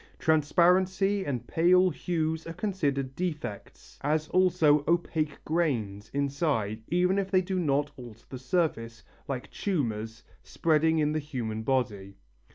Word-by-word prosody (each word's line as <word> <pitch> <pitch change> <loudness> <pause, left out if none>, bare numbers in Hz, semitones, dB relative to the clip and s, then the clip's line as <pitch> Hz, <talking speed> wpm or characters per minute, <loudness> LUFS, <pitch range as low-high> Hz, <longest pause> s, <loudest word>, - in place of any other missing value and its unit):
Transparency 185 +5 +2
and 125 -4 -3
pale 180 +5 +4
hues 160 0 -2
are 165 - -5
considered 145 -9 -2
defects, 155 - -6
as 155 +2 0
also 170 -5 +3
opaque 160 -3 0
grains 115 -11 -1
inside 140 -7 -1
even 180 +3 +2
if 195 -1 -2
they 185 -1 +3
do 185 0 -2
not 145 -3 +1
alter 115 -3 -12
the 130 - -7
surface, 130 -7 -1 0.2
like 130 -3 -5
tumours, 115 - -3 0.2
spreading 160 0 +1
in 150 -1 +2
the 155 - 0
human 120 -7 -4
body. 105 -6 -1
155 Hz, 130 wpm, -28 LUFS, 125-175 Hz, 0.2 s, pale